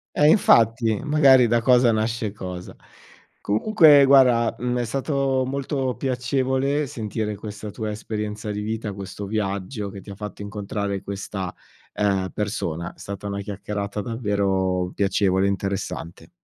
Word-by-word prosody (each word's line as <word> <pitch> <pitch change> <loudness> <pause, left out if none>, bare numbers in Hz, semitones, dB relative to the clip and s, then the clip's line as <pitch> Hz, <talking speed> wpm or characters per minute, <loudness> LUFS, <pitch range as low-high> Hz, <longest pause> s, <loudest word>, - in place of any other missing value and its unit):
Eh 150 - +4
infatti, 115 - +4
magari 140 -5 +6
da 115 +1 +2
cosa 125 -1 +4
nasce 110 -1 -1
cosa. 90 -3 -7 0.6
Comunque 150 - +5
guarda, 125 -4 +5
mhmm, 125 0 -1
è - - 0
stato 135 +1 0
molto 135 -1 -2
piacevole 130 +2 0
sentire 110 -5 -4
questa 105 0 -7
tua 110 +1 -4
esperienza 105 0 -4
di 105 - -4
vita, 110 0 -3
questo 100 +1 -7
viaggio 100 +1 -3
che 100 0 -9
ti 100 - -13
ha 100 - -7
fatto 105 0 -8
incontrare 100 -1 -4
questa, 95 -2 -5 0.4
ehm, 95 -2 0
persona. 85 -6 -3
È - - -30
stata 100 0 -6
una 100 0 -3
chiacchierata 100 0 -4
davvero 95 -5 -1
piacevole 95 -1 +1
e - - +2
interessante. 95 -3 -4
105 Hz, 140 wpm, -23 LUFS, 100-125 Hz, 0.6 s, magari